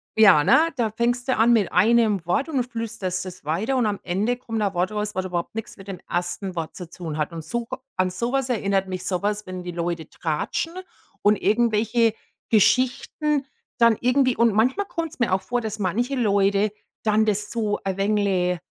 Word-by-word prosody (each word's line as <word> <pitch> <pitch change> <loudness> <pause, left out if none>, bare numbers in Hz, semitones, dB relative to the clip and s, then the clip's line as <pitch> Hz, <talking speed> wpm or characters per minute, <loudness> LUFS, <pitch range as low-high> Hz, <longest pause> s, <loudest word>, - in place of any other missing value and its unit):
Ja, 195 -9 +7
ne? 315 - +5
Da 230 -5 0
fängst 240 +3 -1
du 260 - +2
an 235 +2 +5
mit 210 -5 +2
einem 215 -1 +3
Wort 215 - +1
und 275 -6 0
flüsterst 225 -6 -4
das 185 -3 -9
weiter 195 - 0
und 235 -4 +2
am 205 -1 -2
Ende 210 +7 0
kommt 225 -3 -4
da 205 - +2
ein 195 - -4
Wort 180 +3 0
raus, 210 -1 -3
was 185 - -1
überhaupt 175 +3 -3
nichts 225 +1 -5
mit 195 0 -13
dem 185 -3 -6
1. 175 +2 -3
Wort 165 -1 -4
zu 180 -3 -7
tun 165 -4 -6
hat. 155 +2 -2
Und 165 -1 -6
so 235 +8 -3 0.3
an 185 0 +1
sowas 245 +7 -1
erinnert 195 -4 0
mich 185 -1 -5
sowas, 205 +3 -1
wenn 185 -1 -6
die 175 - -5
Leute 170 -2 -3
tratschen 165 - -2 0.5
und 210 +1 +5
irgendwelche 225 +1 +2 0.4
Geschichten 260 +6 +2 0.3
dann 230 -2 +5
irgendwie 255 0 +3
und 235 -2 +4
manchmal 255 - +2
kommt's 330 -4 -5
mir 235 -6 +1
auch 190 - +2
vor, 245 0 -2
dass 220 -1 -5
manche 225 +8 -1
Leute 200 -2 +2 0.3
dann 215 0 +3
das 210 0 -1
so 215 -3 -1
ein 195 -1 -2
wenig, 195 -3 +1
210 Hz, 195 wpm, -23 LUFS, 185-235 Hz, 0.5 s, Ja